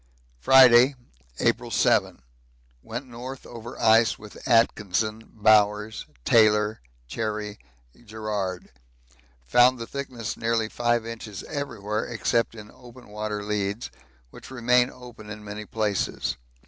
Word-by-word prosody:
Friday, 130 - +7 0.4
April - - 0
7. - - +1 0.6
Went 120 - -6
north 130 +2 -9
over 120 0 -9
ice 115 0 +4
with 105 +4 -11
Atkinson, 110 -2 +1
Bowers, 105 0 +2 0.2
Taylor, 105 -1 +3 0.3
Cherry 105 - -4 0.5
Garrard; 105 -4 -4 0.7
found 125 - +5
the 115 - -6
thickness 130 -4 -5
nearly 115 -1 -1
5 120 -1 0
inches 110 -3 -7
everywhere 110 -8 -4
except 115 0 -1
in 105 -1 -11
open 125 -1 -15
water 105 0 -4
leads, 105 +2 -3 0.4
which - - -12
remain 125 0 +2
open 120 -5 -12
in 105 0 -8
many 105 0 -7
places. 105 -4 -1
110 Hz, 110 wpm, -25 LUFS, 105-120 Hz, 0.7 s, Friday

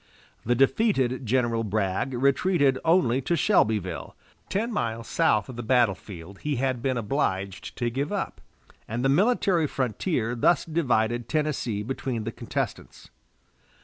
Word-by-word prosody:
The 120 +2 +1
defeated 135 - +2
General 120 -1 +1
Bragg 105 +4 -1
retreated 140 +1 +2
only 160 -7 +3
to 170 +7 0
Shelbyville, 110 - +1 0.3
ten 225 +4 -1
miles 115 - -2
south 105 -1 +2
of 130 -3 -9
the - - -3
battle 120 -3 +3
field 95 0 -11
he 150 -1 -2
had 130 -1 -1
been 130 0 0
obliged 100 -5 -2
to 120 -1 -1
give 140 - -2
up, 205 -2 -3 0.5
and 120 +4 -2
the - - +4
military 185 - +3
frontier 125 - -1
thus 125 +8 +2
divided 120 -7 0
Tennessee 145 -9 -1
between 120 -1 -3
the 115 - -3
contestants. - - -5
125 Hz, 140 wpm, -26 LUFS, 110-150 Hz, 0.5 s, the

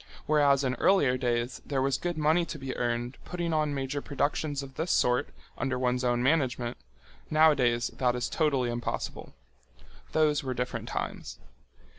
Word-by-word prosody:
Whereas 145 -2 +4
in 130 -1 +1
earlier 145 -10 +4
days 120 -1 -1
there 140 -2 -2
was 135 -1 +1
good 175 -2 -3
money 155 +3 +3
to 165 - -6
be 135 -2 -5
earned 120 +1 -2
putting 170 -2 -3
on 155 -1 +1
major 135 +1 -2
productions 145 0 -1
of 135 -1 -10
this 160 +6 -3
sort 125 - +2 0.3
under 130 0 -1
one's 125 0 0
own 120 -1 +1
management, 130 -4 +1 0.5
nowadays 140 -7 +4
that 125 -1 0
is 120 -1 -1
totally 135 -6 +1
impossible. 120 0 -4 0.8
Those 150 -2 +2
were 130 -1 -3
different 125 0 -3
times. - - -4
135 Hz, 155 wpm, -29 LUFS, 125-150 Hz, 0.8 s, Whereas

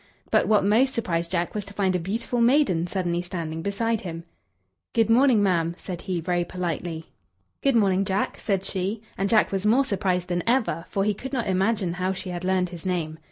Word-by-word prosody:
But - - +3
what 210 -3 +4
most 245 +6 +3
surprised 170 -7 -1
Jack 175 -1 -1
was 210 - -3
to 200 0 -11
find 190 -2 +1
a - - +1
beautiful 230 +7 -2
maiden 235 - +3
suddenly 175 -2 -1
standing 165 -3 -5
beside 220 +4 -1
him. 165 -2 -6 0.7
"Good 225 -1 +3
morning, 245 -3 +5
ma'am," 170 -3 +1
said 180 -3 -6
he, 180 -2 -2
very 175 +1 0
politely. 170 -2 -4 0.6
"Good 275 -3 +2
morning, 195 -3 +3
Jack," 195 0 -1
said 195 -2 -1
she; 195 +4 -3
and 195 +1 -1
Jack 220 -2 +4
was 195 -1 -1
more 240 +6 +4
surprised 185 -5 -1
than 175 -1 -1
ever, 225 -10 +1
for 195 - -1
he 210 +1 +2
could 265 +7 -8
not 245 -4 0
imagine 190 -1 +1
how 185 +1 -1
she 185 0 -6
had 175 0 -5
learned 185 -1 +1
his 170 -2 -9
name. 165 -4 -2
190 Hz, 205 wpm, -25 LUFS, 175-215 Hz, 0.7 s, morning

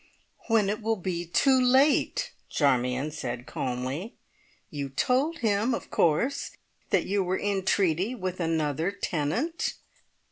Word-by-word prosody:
"When 225 -3 +3
it 210 +3 -2
will 225 +1 +1
be 175 -3 -3
too 260 +9 +4
late!" 275 - +3 0.2
Charmion 130 0 +1
said 125 -5 -5
calmly. 130 - -4 0.6
"You 140 -2 -4
told 265 - +1
him, 220 +2 +1
of - - -8
course, 235 - +1 0.4
that - - +2
you 200 0 +1
were 185 +1 0
in 200 -2 -1
treaty 190 +5 +1
with 185 -4 -4
another 160 0 0
tenant?" 200 - -2
185 Hz, 130 wpm, -27 LUFS, 150-230 Hz, 0.6 s, too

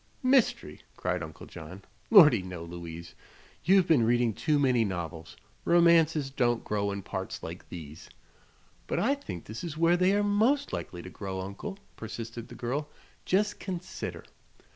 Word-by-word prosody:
"Mystery!" 255 - +2 0.2
cried 90 0 -1
Uncle 80 -1 -8
John. 95 +5 -10 0.3
"Lordy, 150 - +8
no, 90 -2 -7
Louise. 85 0 -8 0.5
You've 190 0 +5
been 155 -7 +5
readin' 120 0 +2
too 150 +8 +1
many 130 -5 +3
novels. 85 -4 -5 0.3
Romances 165 -4 +4
don't 120 -3 +1
grow 100 -1 -1
in 100 -1 -5
parts 95 0 -5
like 85 +2 -8
these." 80 -2 -9 0.8
"But - - -1
I 275 - +3
think 275 - -7
this 110 +2 -7
is 160 -3 -5
where 170 +2 +4
they 185 +2 +3
are 205 - +2
most 225 +8 +2
likely 85 -1 -5
to 90 - -9
grow, 95 -1 -5
Uncle," 100 - -6 0.2
persisted 115 +1 -7
the - - -11
girl, 140 +5 -3 0.4
"just 210 +3 +1
consider. 180 -2 -5
120 Hz, 155 wpm, -29 LUFS, -, 0.8 s, Lordy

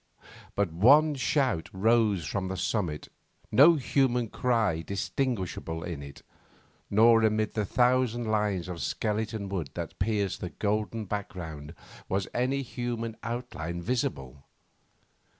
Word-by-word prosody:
But 100 -4 +1
one 145 - +6
shout 130 - 0
rose 105 -3 +2
from 95 +5 -2
the 95 0 -4
summit, 90 -5 -2 0.4
no 160 +6 +7
human 125 -4 +1
cry 110 -11 +1
distinguishable 95 -4 -3
in 85 -5 -5
it, 70 -1 -11 0.7
nor 115 +2 +6
amid 110 -1 +1
the 105 -2 -1
thousand 120 +1 +2
lines 105 -4 0
of 90 -3 -6
skeleton 105 +4 -2
wood 90 -7 -3
that - - -6
pierced 100 -2 0
the 90 - -3
golden 105 +3 -2
background 85 -6 -6 0.3
was 95 0 0
any 135 +3 0
human 120 -2 -4
outline 115 -8 -4
visible. 85 - -3
105 Hz, 120 wpm, -28 LUFS, 90-120 Hz, 0.7 s, no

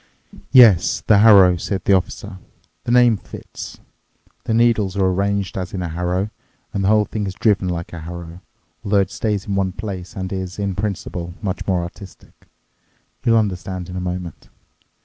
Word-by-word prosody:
"Yes, 115 -10 +6
the 105 -2 +5
harrow," 100 -5 +7
said 95 +1 -4
the 100 - +4
Officer. 95 +1 -2 0.5
"The - - -1
name 120 -2 +5
fits. - - -10 0.7
The 110 - 0
needles 110 -5 +2
are 95 - +2
arranged 100 +1 0
as 90 +1 -5
in 90 - -3
a 85 - -3
harrow, 90 +5 -2 0.4
and 100 - -1
the - - +1
whole 105 0 +4
thing 105 -2 -4
is 95 - -5
driven 100 -3 +1
like 85 -1 -4
a 85 - -6
harrow, 85 +1 -8 0.4
although 100 -1 +3
it 95 - -3
stays 105 -3 -2
in 100 - -3
one 95 -1 0
place 95 -3 -7
and 95 0 -4
is, 95 -1 -5
in 100 -1 -2
principle, 90 -3 -4
much 95 -2 -3
more 90 -3 +1
artistic. 90 +1 -12 0.8
You'll 115 -2 +4
understand 95 -3 -2
in 90 - -7
a 90 - -3
moment. 90 -2 -6
95 Hz, 175 wpm, -20 LUFS, 90-105 Hz, 0.8 s, harrow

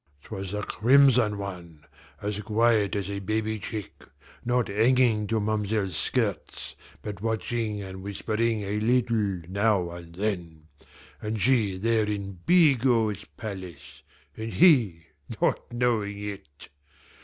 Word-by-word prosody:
"'Twas 95 -3 -6
the 105 +2 -3
crimson 125 -3 +4
one, 85 -6 -8 0.4
as 105 0 -2
quiet 110 -1 +2
as 100 -3 -2
a 100 0 -4
baby 110 +2 -2
chick, 105 +1 -7 0.4
not 120 0 +1
hanging 110 0 +3
to 115 +1 0
ma'm'selle's 105 -3 -1
skirts, - - -2 0.3
but 100 -3 -6
watching 110 -1 -2
and 95 -1 -8
whispering 110 +2 -1
a 100 +2 -2
little 110 -5 +1
now 100 -2 +1
and 85 -1 -10
then 90 -6 -3 0.6
and 110 0 -3
she 105 -4 +2
there 110 +2 +2
in 100 -3 -4
Bigot's 130 - +3
palace, 85 -8 -8 0.3
and 110 0 -5
he 115 - +4 0.3
not - - 0
knowing 115 -4 0
it! 100 -8 -8
105 Hz, 120 wpm, -26 LUFS, 95-115 Hz, 0.6 s, crimson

